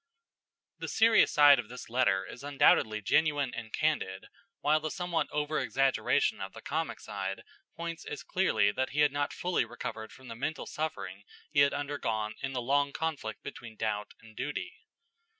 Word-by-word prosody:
The - - -4
serious 225 0 +5
side 145 -2 +7
of 115 -2 -5
this 125 +1 -8
letter 115 -6 +2
is 125 - -10
undoubtedly 110 -6 +3
genuine 145 +1 +2
and 115 -1 -6
candid, 100 -12 -1 0.3
while 155 +1 +3
the 155 0 -3
somewhat 175 0 -1
over 150 +1 -1
exaggeration 135 0 +1
of - - -5
the - - -10
comic - - -2
side - - -5 0.3
points 170 0 -5
as 150 - -6
clearly 180 - +2
that 130 +5 -1
he 150 - +2
had 145 -1 +5
not 145 0 -1
fully 180 0 0
recovered 110 -2 -6
from 130 0 -14
the 115 - -7
mental 150 +6 -3
suffering 100 -12 -4 0.3
he 145 - +2
had 140 0 +5
undergone 120 -7 -2
in 135 -1 -3
the 125 -2 -2
long 140 +2 +2
conflict 145 -9 -3
between 115 -2 -8
doubt 105 -2 -2
and 110 -1 -16
duty. 360 - -4
140 Hz, 170 wpm, -30 LUFS, 115-150 Hz, 0.3 s, side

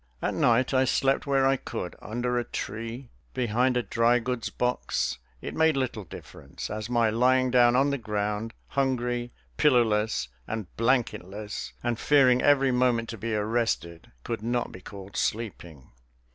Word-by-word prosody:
At - - -1
night 125 +3 +2
I 130 0 +4
slept 135 +2 +1
where 135 -1 +3
I 135 0 +3
could 90 - -6
under 120 +3 -2
a - - -1
tree, 115 +3 -6 0.2
behind 125 +1 +1
a 125 - 0
drygoods 120 +1 +1
box; 65 - -1 0.2
it - - -5
made 160 -2 +3
little 120 -6 -2
difference, - - -9
as 110 +1 -4
my 115 -2 +2
lying 130 +2 +3
down 120 -1 +5
on 135 +2 +3
the 140 - -1
ground, 105 0 -3
hungry, 125 -3 -1 0.3
pillowless, 110 - +2 0.2
and 110 -5 -5
blanketless, 105 -4 -1
and 120 -2 -1
fearing 130 -4 +4
every 135 -2 +4
moment 125 -2 +1
to 115 - -5
be 115 +1 -2
arrested, 105 -6 -1
could 115 -2 -4
not 120 +2 -1
be 95 - -11
called 100 +1 -10
sleeping. 90 - -3
120 Hz, 150 wpm, -27 LUFS, 110-130 Hz, 0.3 s, down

